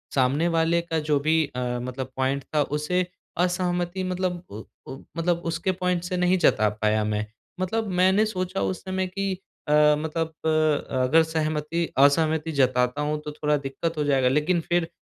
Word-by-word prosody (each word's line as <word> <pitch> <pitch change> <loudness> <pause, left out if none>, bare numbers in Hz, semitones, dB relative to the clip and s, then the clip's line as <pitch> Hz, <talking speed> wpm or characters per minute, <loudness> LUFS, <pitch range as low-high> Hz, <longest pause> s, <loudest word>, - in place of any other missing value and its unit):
सामने 140 +5 +2
वाले 165 0 +2
का 165 -1 -2
जो 150 -1 +1
भी 160 +2 +2
अ, - - -2 0.2
मतलब 130 +1 -5
पॉइंट 135 +1 0
था। 150 -1 0
उसे 150 +6 -1 0.3
असहमति 180 0 0
मतलब 180 -1 -2
उ 105 +2 -8 0.3
उ 135 - -7 0.2
मतलब 170 +1 +1
उसके 170 +3 -1
पॉइंट 180 -1 -1
से 180 0 -3
नहीं 180 +1 +3
जता 110 -10 +3
पाया 110 0 +2
मैं। 105 0 -1 0.3
मतलब 220 +4 -1
मैंने 190 +4 +4
सोचा 185 -2 -3
उस 185 - -2
समय 190 0 -2
कि 195 +1 -2 0.3
अ, - - -1 0.3
मतलब 160 +1 -2 0.2
अ, 160 - +3 0.5
अगर 160 +6 +5
सहमति 160 +1 -1
असहमति 155 +3 +3
जताता 130 -1 +1
हूँ 150 +1 -1
तो 150 - -4
थोड़ा 150 0 0
दिक्कत 145 +4 -4
हो 150 - +1
जाएगा। 135 -3 +2
लेकिन 155 +5 +1
फिर 175 -1 +2
160 Hz, 170 wpm, -25 LUFS, 145-180 Hz, 0.5 s, अगर